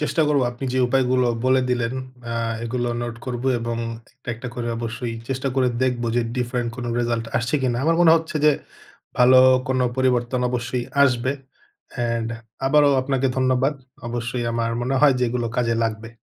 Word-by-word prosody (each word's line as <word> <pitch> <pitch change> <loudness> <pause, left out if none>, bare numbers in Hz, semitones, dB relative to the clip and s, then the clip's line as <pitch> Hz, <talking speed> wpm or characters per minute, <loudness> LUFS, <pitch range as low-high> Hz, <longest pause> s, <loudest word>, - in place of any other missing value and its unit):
চেষ্টা 155 +2 +1
করব। 145 -2 +3
আপনি 120 +2 -7
যে 130 - 0
উপায়গুলো 130 -1 +2 0.2
বলে 130 0 +4
দিলেন 120 -1 0 0.3
অ্যা 115 - -6 0.3
এগুলো 120 +1 -2
নোট 120 -1 -5
করব। 125 -1 -3 0.2
এবং 115 0 -3 0.4
একটা, 130 -1 -17
একটা 125 +2 -7
করে 120 -1 -3
অবশ্যই 115 +1 -4
চেষ্টা 135 +1 -2
করে 130 -2 +3
দেখব 125 -2 0
যে 120 - +3
ডিফারেন্ট 120 -1 -1
কোন 125 - -5
রেজাল্ট 115 -1 0
আসছে 120 +5 -1
কিনা। 125 -2 +1
আমার 165 +1 +3
মনে 165 -2 +7
হচ্ছে 160 -1 -3
যে 150 - +7 0.7
ভালো 125 +1 +7 0.3
কোন 130 0 +1 0.2
পরিবর্তন 125 -1 +1
অবশ্যই 125 0 -2 0.2
আসবে। 130 -1 +2 0.6
অ্যান্ড 115 -2 -1 0.4
আবারও 145 0 +5
আপনাকে 135 0 0
ধন্যবাদ। 130 +2 +2 0.3
অবশ্যই 120 +1 -3
আমার 115 0 -1
মনে 130 +2 -1
হয় 145 -3 +6
যে - - -1
এগুলো 120 0 -2
কাজে 115 -2 +1
লাগবে। 110 0 -4
125 Hz, 170 wpm, -22 LUFS, 120-130 Hz, 0.7 s, মনে